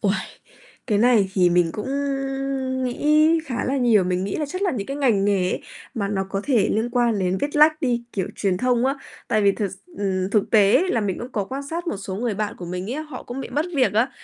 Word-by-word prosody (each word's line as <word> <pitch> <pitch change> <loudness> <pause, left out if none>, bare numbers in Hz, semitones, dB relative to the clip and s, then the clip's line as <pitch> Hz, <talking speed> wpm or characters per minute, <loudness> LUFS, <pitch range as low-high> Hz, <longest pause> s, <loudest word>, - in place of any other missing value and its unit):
Uầy, 200 -1 +2 0.7
cái 210 -5 +1
này 225 -5 +4
thì 180 -2 +4
mình 175 -1 +3
cũng 210 - -5 1.0
nghĩ 305 +5 +3
khá 255 -6 -3
là 270 +2 0
nhiều, 230 -7 +4
mình 180 +1 -1
nghĩ 195 - -3
là 300 - -2
chắc 370 +6 -5
là 380 - +2
những 205 -6 -4
cái 275 - -4
ngành 235 -9 +2
nghề 195 -3 +2
ấy, - - -2 0.3
mà 205 -5 -2
nó 195 -1 -1
có 195 0 -1
thể 240 -8 +2
liên 225 +3 0
quan 240 -3 +1
đến 185 0 0
viết 290 +1 -2
lách 310 +1 +5
đi, 240 -4 0
kiểu, 190 -3 -2
truyền 190 -3 0
thông 250 +2 +1
á. 270 - +1 0.3
Tại 215 - +2
vì 200 -1 +5
thực 200 -2 -2
s 190 - -11 0.2
ừm, 190 -1 -1
thực 210 -2 +1
tế 205 - +5
là 230 - +1
mình 200 -3 -2
cũng 245 +2 -7
có 205 - -1
quan 270 +7 -5
sát 335 +5 -5
một 210 - -2
số 195 -1 -6
người 230 0 -1
bạn 210 0 -3
của 175 - -8
mình 180 +5 -4
ấy, 310 - -3
họ 300 -5 -9
cũng 250 +3 -6
bị - - -6
mất 300 +3 0
việc 260 -2 +3
á, 225 +5 +2
220 Hz, 255 wpm, -23 LUFS, 195-265 Hz, 1.0 s, lách